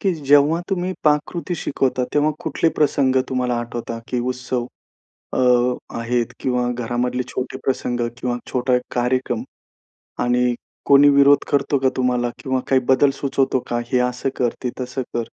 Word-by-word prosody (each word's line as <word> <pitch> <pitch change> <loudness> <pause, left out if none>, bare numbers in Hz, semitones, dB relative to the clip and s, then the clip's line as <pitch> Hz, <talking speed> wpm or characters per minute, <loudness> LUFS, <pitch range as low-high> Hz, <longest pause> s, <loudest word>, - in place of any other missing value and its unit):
की 195 - +1
जेव्हा 145 +2 +3
तुम्ही 185 -1 -1
पाककृती 155 +4 +1
शिकवता, 135 -4 -1
तेव्हा 150 +1 +3
कुठले 165 - +1
प्रसंग 140 -3 +2
तुम्हाला 125 -2 0
आठवता? 120 -1 -5
की 125 - -1
उत्सव 125 -1 -3 0.7
अ, - - 0 0.6
आहेत 120 0 -1
किंवा 125 -1 0
घरामधले 125 +1 -2
छोटे 130 +1 -4
प्रसंग 125 -2 -1 0.2
किंवा 120 0 -2
छोटा 125 0 0
एक 125 - +1
कार्यक्रम. 125 +1 0 0.8
आणि 125 0 +2 0.3
कोणी 140 +1 +7
विरोध 140 0 +5
करतो 140 0 +2
का 135 0 +2
तुम्हाला? 125 -1 +1
किंवा 130 -2 0
काही 135 -1 +4
बदल 135 +2 +5
सुचवतो 135 -1 +1
का? 120 0 -1
हे 125 - +4
असं 125 +2 -3
कर, 120 -2 0
ते 125 - -1
तसं 125 +1 -3
कर. 120 - 0
130 Hz, 150 wpm, -21 LUFS, 125-140 Hz, 0.8 s, कोणी